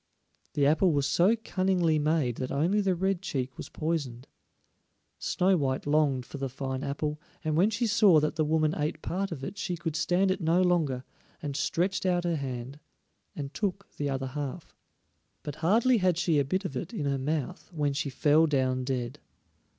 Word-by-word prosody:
The 145 - +2
apple 160 +4 +4
was 140 -1 +1
so 175 +10 +4
cunningly 180 -5 +1
made 150 -5 +1
that 130 -1 -3
only 170 +9 +2
the 190 -2 +1
red 190 0 0
cheek 135 -8 -3
was - - -8
poisoned. 145 -6 -3 0.9
Snow 185 +1 +2
white 135 -5 -1
longed 145 -4 +2
for 140 - -8
the 135 -1 -2
fine 130 0 -4
apple, 150 +2 -3 0.2
and 155 -1 0
when 185 +6 +4
she 225 +2 -1
saw 205 -6 +5
that 150 0 -1
the 155 - +2
woman 155 0 +2
ate 155 0 -2
part 195 +2 -2
of 140 -5 -6
it 195 +8 -6
she 175 -2 -2
could 165 -2 -4
stand 180 +4 +2
it 185 - -2
no 170 +3 +3
longer, 155 -8 +1 0.4
and 145 -2 -4
stretched 180 +6 0
out 175 -1 +2
her 170 -1 0
hand 130 0 -5 0.6
and 140 -1 -5
took 200 -1 -3
the 145 -1 -1
other 135 -1 -2
half. 145 +4 -5 0.7
But 145 -1 -6
hardly 225 +8 +3
had 180 -3 +2
she 165 -4 +2
a 140 - +1
bit 185 +8 -1
of 140 - -4
it 165 - -5
in 150 - -2
her 140 -1 0
mouth 150 +5 -3
when 150 -4 0
she 145 +1 -2
fell 150 +4 +4
down 130 -3 +1
dead. 130 +1 -3
155 Hz, 190 wpm, -28 LUFS, 140-180 Hz, 0.9 s, saw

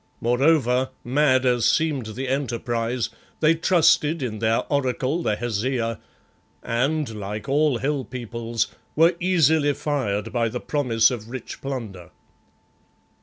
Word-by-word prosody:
Moreover, 130 0 +2
mad 130 0 +2
as 125 -2 +2
seemed 150 -7 +1
the 130 +2 -4
enterprise, 120 -3 -1 0.3
they 155 +1 +4
trusted 165 -2 +3
in 110 -4 -4
their 110 +1 +2
Oracle, 140 +2 0
the 105 - 0
Hesea, 115 +1 -2 0.6
and, 140 +6 0
like 105 +3 -5
all 145 -1 +2
hill 140 +2 -1
peoples, 115 -1 -3 0.3
were 165 +3 +5
easily 160 -5 +3
fired 115 -8 -2
by 115 -1 +1
the 125 +2 -4
promise 120 -7 +2
of 115 -3 -6
rich 125 -1 -7
plunder. 110 -10 -6
130 Hz, 125 wpm, -23 LUFS, 115-145 Hz, 0.6 s, were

